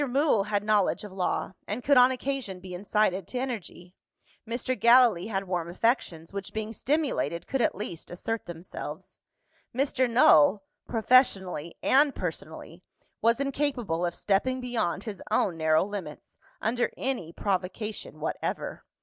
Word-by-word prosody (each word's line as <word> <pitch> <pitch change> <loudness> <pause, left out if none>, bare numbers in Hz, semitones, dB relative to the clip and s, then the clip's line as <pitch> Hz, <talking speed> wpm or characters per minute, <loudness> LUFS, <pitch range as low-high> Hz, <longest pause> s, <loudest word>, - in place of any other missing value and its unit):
Mool 265 -6 +2
had 205 -1 -1
knowledge 210 -2 +2
of 205 - -8
law, 190 0 -1
and 220 +5 -4
could 285 - +4
on 250 0 +7
occasion 260 -7 -3
be 180 0 -9
incited 195 -1 0
to 255 - -5
energy. 210 -8 -5 0.5
Mr. 240 +2 -1
Gallilee 235 -7 +5
had 195 -3 -2
warm 175 -2 -2
affections, 175 -5 -1
which, 200 -1 -6
being 220 0 -4
stimulated, 275 - -1
could 270 - -1
at - - +2
least 180 -4 -6
assert 225 +6 -4
themselves. 175 +1 -8 0.6
Mr. 260 -1 +1
Null, 195 - +5 0.2
professionally 195 - +2
and 280 +1 +4
personally, 165 0 -6 0.4
was 230 +2 +3
incapable 265 - -1
of 175 -1 -1
stepping 255 +6 +1
beyond 235 -7 -2
his 210 -3 -6
own 180 - +1
narrow 160 -1 +3
limits, 190 -7 -8 0.2
under 240 +2 +1
any 250 -12 -2
provocation 200 +3 -3
whatever. - - -3
210 Hz, 140 wpm, -28 LUFS, 180-250 Hz, 0.6 s, on